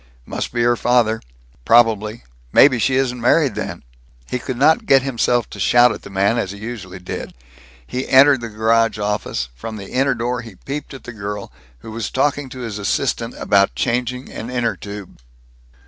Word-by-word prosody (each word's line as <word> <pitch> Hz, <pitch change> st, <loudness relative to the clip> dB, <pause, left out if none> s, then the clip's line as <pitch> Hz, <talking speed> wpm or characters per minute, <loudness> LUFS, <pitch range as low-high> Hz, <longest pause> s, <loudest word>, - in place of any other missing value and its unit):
"Must -, -, -4 dB
be 120 Hz, 0 st, 0 dB
her 120 Hz, 0 st, +3 dB
father. 115 Hz, -2 st, +2 dB, 0.4 s
Probably 115 Hz, -, +3 dB, 0.3 s
maybe 130 Hz, -4 st, +6 dB
she 130 Hz, +3 st, +2 dB
isn't 125 Hz, -2 st, 0 dB
married 140 Hz, +3 st, +3 dB
then." -, -, -5 dB, 0.5 s
He 125 Hz, -, -1 dB
could 130 Hz, 0 st, -5 dB
not 160 Hz, -, +3 dB
get 135 Hz, -4 st, +5 dB
himself 120 Hz, -3 st, +1 dB
to 100 Hz, -, -9 dB
shout 120 Hz, +7 st, +5 dB
at -, -, -6 dB
the -, -, -11 dB
man, 100 Hz, +4 st, +1 dB
as 95 Hz, -, -2 dB
he 100 Hz, -, -7 dB
usually 105 Hz, -4 st, -7 dB
did. 90 Hz, -1 st, -7 dB, 0.5 s
He 125 Hz, -, -4 dB
entered 135 Hz, -1 st, +6 dB
the 115 Hz, -, -5 dB
garage 110 Hz, 0 st, +2 dB
office; 105 Hz, -, -2 dB
from 110 Hz, -, -7 dB
the 100 Hz, -1 st, -9 dB
inner 135 Hz, +1 st, +2 dB
door 120 Hz, +1 st, -2 dB
he 115 Hz, -4 st, -12 dB
peeped 140 Hz, +6 st, -6 dB
at 135 Hz, -, -11 dB
the 125 Hz, -, -8 dB
girl, 105 Hz, -1 st, -6 dB, 0.3 s
who 110 Hz, -, -9 dB
was 115 Hz, 0 st, -4 dB
talking 140 Hz, 0 st, 0 dB
to 130 Hz, 0 st, -8 dB
his 110 Hz, -3 st, -5 dB
assistant 100 Hz, -, -1 dB
about -, -, +2 dB
changing 125 Hz, -, -2 dB
an 115 Hz, -, -6 dB
inner 120 Hz, -2 st, -1 dB
tube. 100 Hz, -2 st, -9 dB
120 Hz, 185 wpm, -20 LUFS, 105-125 Hz, 0.5 s, maybe